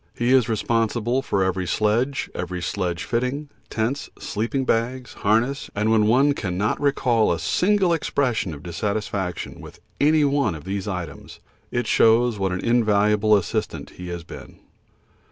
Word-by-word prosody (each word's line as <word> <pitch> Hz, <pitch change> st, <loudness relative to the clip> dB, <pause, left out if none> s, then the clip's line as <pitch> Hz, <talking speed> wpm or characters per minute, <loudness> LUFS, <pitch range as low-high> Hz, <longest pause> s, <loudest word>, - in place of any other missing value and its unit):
He 120 Hz, +2 st, +2 dB
is 125 Hz, -3 st, +4 dB
responsible 115 Hz, +2 st, 0 dB
for 100 Hz, -7 st, 0 dB
every 95 Hz, -1 st, -1 dB
sledge, 120 Hz, +9 st, 0 dB
every 90 Hz, 0 st, -4 dB
sledge 90 Hz, -1 st, -2 dB
fitting, 125 Hz, +5 st, -2 dB, 0.2 s
tents, 120 Hz, +6 st, -2 dB
sleeping 120 Hz, +5 st, -2 dB
bags, 125 Hz, +2 st, -1 dB
harness, 115 Hz, +7 st, 0 dB
and 105 Hz, +2 st, +1 dB
when 110 Hz, -1 st, +4 dB
one 135 Hz, +6 st, +4 dB
cannot 100 Hz, -1 st, -2 dB
recall 125 Hz, -7 st, +2 dB
a 85 Hz, -, 0 dB
single 180 Hz, -, +2 dB
expression 125 Hz, -, -1 dB
of 70 Hz, -, -12 dB
dissatisfaction 95 Hz, +1 st, -3 dB
with -, -, -12 dB, 0.2 s
any 150 Hz, +1 st, +4 dB
one 140 Hz, -, +1 dB
of 75 Hz, -, -9 dB
these 100 Hz, +2 st, -4 dB
items, 90 Hz, -7 st, -6 dB, 0.3 s
it 120 Hz, 0 st, -1 dB
shows 115 Hz, -1 st, +3 dB
what 95 Hz, -1 st, 0 dB
an 90 Hz, -, -2 dB
invaluable 105 Hz, -2 st, +3 dB
assistant 95 Hz, -, -3 dB
he 90 Hz, -, -9 dB
has 85 Hz, -1 st, -5 dB
been. -, -, -11 dB
110 Hz, 150 wpm, -23 LUFS, 95-125 Hz, 0.3 s, is